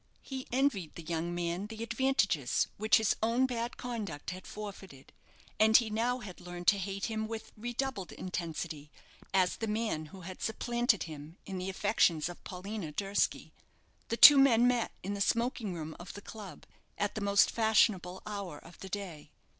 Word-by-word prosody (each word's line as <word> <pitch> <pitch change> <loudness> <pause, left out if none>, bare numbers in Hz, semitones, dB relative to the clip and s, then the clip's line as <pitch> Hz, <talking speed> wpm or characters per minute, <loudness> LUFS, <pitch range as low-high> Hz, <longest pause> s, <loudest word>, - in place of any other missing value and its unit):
He 265 -1 -6
envied 245 - 0
the 170 - -8
young 170 +1 -2
man 175 +3 -2
the 220 +1 -6
advantages 230 - +1
which 215 +1 +5
his 220 -2 +2
own 230 +4 +3
bad 240 -2 -3
conduct 210 - -5
had 185 +1 -9
forfeited; 195 -9 -9 0.5
and 220 +1 +7
he 230 -3 0
now 235 +3 +1
had 190 -4 -9
learned 175 0 -8
to 200 - +2
hate 195 +1 -3
him 220 -1 -2
with 225 0 -6
redoubled 240 -3 -3
intensity, 165 -4 -5 0.4
as 185 -2 +2
the 225 - -3
man 210 -8 -1
who 190 +5 -12
had 185 +1 -9
supplanted 235 0 +1
him 155 +1 -9
in 190 -1 -5
the 185 +1 -3
affections 185 -5 +2
of 175 - -10
Paulina 190 -2 -6
Durski. 195 +6 -1 0.5
The 230 - -2
two 290 +2 +11
men 245 -3 +6
met 245 -2 +1
in 200 +2 -2
the 200 - -4
smoking 230 -1 0
room 160 -1 -6
of 175 - -9
the 205 - -8
club 210 -4 -10 0.3
at 205 - -1
the 215 - -4
most 200 0 +4
fashionable 210 -5 +2
hour 200 -7 -5
of 165 +3 -15
the 190 - -8
day. 180 -7 -6
200 Hz, 175 wpm, -32 LUFS, 175-225 Hz, 0.5 s, two